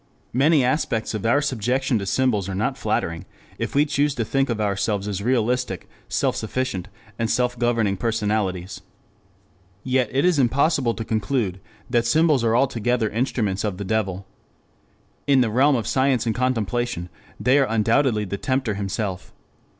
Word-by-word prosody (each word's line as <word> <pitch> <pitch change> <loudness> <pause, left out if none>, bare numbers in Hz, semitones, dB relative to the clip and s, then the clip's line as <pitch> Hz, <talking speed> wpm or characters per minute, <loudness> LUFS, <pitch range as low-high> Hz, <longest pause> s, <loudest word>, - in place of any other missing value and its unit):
Many 140 +3 +4
aspects 125 -4 0
of 110 0 -2
our 140 +5 +3
subjection 125 0 0
to 100 - -5
symbols 105 -5 +1
are 95 - -3
not 105 - -1
flattering 85 0 -2 0.3
if - - -3
we 145 +1 +5
choose 145 -1 0
to 115 - -1
think 135 +3 0
of 115 -2 -1
ourselves 100 0 -1
as 100 -2 -3
realistic, 120 -3 0 0.2
self - - 0
sufficient, 110 -5 -3 0.3
and 115 -1 0
self 125 +1 +1
governing 115 -5 +1
personalities. 105 -4 -1 1.0
Yet 130 -3 +1
it 135 +5 +1
is 180 -5 +3
impossible 135 -1 +2
to 115 - -5
conclude 110 -3 -1 0.3
that 120 -2 +1
symbols 155 -1 +3
are 115 0 +2
altogether 120 -3 +1
instruments 110 -4 -1
of 105 -4 -2
the 100 - -5
devil. 95 -2 -1 1.0
In 135 -2 +5
the 115 -3 +1
realm 135 +5 +4
of 115 -4 -1
science 130 0 +1
and 115 - +1
contemplation 120 -5 -1 0.3
they 125 +7 +4
are 135 - +3
undoubtedly 115 0 +2
the 100 +1 -4
tempter 130 -5 0
himself. 100 -2 -4
115 Hz, 160 wpm, -23 LUFS, 105-130 Hz, 1.0 s, we